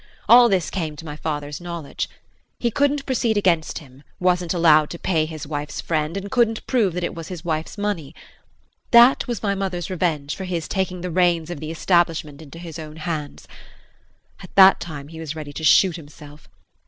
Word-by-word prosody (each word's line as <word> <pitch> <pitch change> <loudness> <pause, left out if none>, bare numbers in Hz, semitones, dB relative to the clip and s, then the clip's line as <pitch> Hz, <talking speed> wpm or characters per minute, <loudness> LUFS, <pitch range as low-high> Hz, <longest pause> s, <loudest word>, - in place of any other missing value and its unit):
All 240 0 +8
this 185 -6 0
came 160 -5 -3
to 165 - -10
my 150 -2 -6
father's 150 0 -4
knowledge. 170 -4 -5 0.5
He 235 - -1
couldn't 285 +3 +1
proceed 235 -4 0
against 175 -5 +1
him, 135 -3 -13 0.2
wasn't 180 -1 +1
allowed 155 -4 +4
to 170 - -6
pay 160 -3 0
his 155 -1 -7
wife's 145 0 -5
friend, 155 +2 -1
and 200 +1 -6
couldn't 230 -3 +1
prove 220 -9 +1
that 180 - -2
it - - -2
was 165 -1 -8
his 175 -3 -8
wife's 160 +3 -3
money. 205 -8 -3 0.7
That 240 +3 +6
was 235 -5 -4
my 200 -1 +1
mother's 190 -3 -3
revenge 160 -5 -1
for 190 - -6
his 170 -3 -3
taking 185 -2 -2
the 180 0 -4
reins 175 -1 +2
of 170 - -6
the 155 - -6
establishment 165 -3 0
into 155 +1 -12
his 165 -1 -8
own 155 -1 -8
hands. 155 -2 -5 0.9
At - - -13
that 195 0 +8
time 145 -4 -7
he 160 0 -10
was 160 -1 -5
ready 150 -2 -7
to 160 - -7
shoot 175 +3 +5
himself. 150 -1 -14
170 Hz, 190 wpm, -22 LUFS, 155-190 Hz, 0.9 s, All